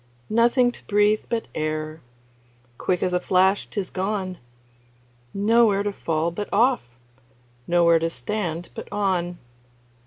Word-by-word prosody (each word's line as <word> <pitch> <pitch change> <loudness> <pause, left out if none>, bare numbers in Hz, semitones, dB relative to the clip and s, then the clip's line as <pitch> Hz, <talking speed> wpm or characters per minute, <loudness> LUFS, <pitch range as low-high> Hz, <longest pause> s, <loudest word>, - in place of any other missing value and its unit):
Nothing 240 +2 +4
to - - -16
breathe 210 +1 +2
but 230 -1 -2
air 155 0 -3 0.8
Quick 180 -1 0
as 180 - 0
a 180 - +2
flash 190 +2 +2
't - - -4
is 190 - -4
gone; 190 -1 -3 0.9
Nowhere 210 0 +3
to 205 0 -2
fall 165 -2 -1
but 205 +5 -5
off, 210 - +1 0.7
Nowhere 170 -1 +4
to 165 +1 0
stand 170 - -3
but - - -9
on. 180 -4 -1
190 Hz, 130 wpm, -24 LUFS, 170-210 Hz, 0.9 s, Nothing